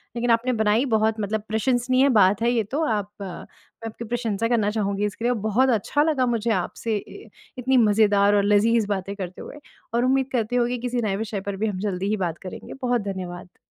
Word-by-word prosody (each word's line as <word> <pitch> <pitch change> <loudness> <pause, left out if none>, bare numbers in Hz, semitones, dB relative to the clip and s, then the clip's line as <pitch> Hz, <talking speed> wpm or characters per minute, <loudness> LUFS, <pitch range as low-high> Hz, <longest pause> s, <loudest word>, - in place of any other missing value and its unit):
लेकिन 235 0 +1
आपने 240 +2 +2
बनाई 220 +5 +3
बहुत 220 0 +2
मतलब 210 +1 -2
प्रशंसनीय 255 +4 +2
बात 195 +2 +4
है 235 +1 +2
ये 235 -2 +1
तो, 280 +10 -2
आप 205 -3 -1
मैं 195 +4 -10
आपकी 230 +1 -7
प्रशंसा 230 -2 -1
करना 220 -4 +1
चाहूँगी 205 -1 -1
इसके 210 +3 -4
लिए 245 - +3
और 240 - -1
बहुत 220 +6 +2
अच्छा 245 +6 +1
लगा 300 -5 +1
मुझे 235 -2 -1
आपसे 220 +3 -3
अ, 405 - -13 0.3
इतनी 260 +1 +2
मज़ेदार 205 -2 +4
और 200 - +3
लज़ीज़ 210 +1 +3
बातें 200 -1 -3
करते 185 -2 -7
हुए। 295 - -10 0.3
और 240 +1 +2
उम्मीद 265 0 +1
करते 245 -1 -1
हूँ 240 -1 +3
कि 245 +1 -2
किसी 245 0 -1
नए 205 -4 -1
विषय 210 -2 -4
पर 200 0 -4
भी 220 - 0
हम 195 -3 -3
जल्दी 195 -2 -2
ही 215 - 0
बात 165 0 -6
करेंगे। - - -8
बहुत 245 -2 +1
धन्यवाद। 180 -1 -8
220 Hz, 215 wpm, -24 LUFS, 205-245 Hz, 0.3 s, बात